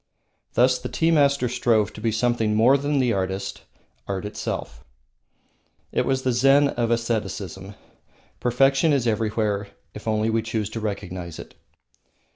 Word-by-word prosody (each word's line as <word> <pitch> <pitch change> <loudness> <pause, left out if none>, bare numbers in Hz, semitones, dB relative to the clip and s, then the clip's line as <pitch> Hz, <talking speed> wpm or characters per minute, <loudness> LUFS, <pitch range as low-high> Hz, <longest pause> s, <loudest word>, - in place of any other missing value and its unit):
Thus 125 +2 +4
the - - -6
tea 165 0 +1
master 140 -4 +3
strove 115 -3 +1
to 110 - -10
be 115 0 +1
something 115 -1 +1
more 120 +5 +5
than 145 +1 0
the 125 -3 +2
artist, 95 0 -3 0.5
art 95 0 -3
itself. 105 - -5 1.1
It - - 0
was 130 -1 0
the 130 - +1
Zen 135 +4 +4
of 120 -3 -1
aestheticism. 105 -4 -3 0.6
Perfection 135 +5 +3
is 135 -4 +1
everywhere 105 -2 0 0.3
if 105 - -10
we - - +2
only 110 +1 +1
choose 110 -2 -3
to 115 - -4
recognise 95 -5 -5
it. - - -10
115 Hz, 145 wpm, -24 LUFS, 105-130 Hz, 1.1 s, more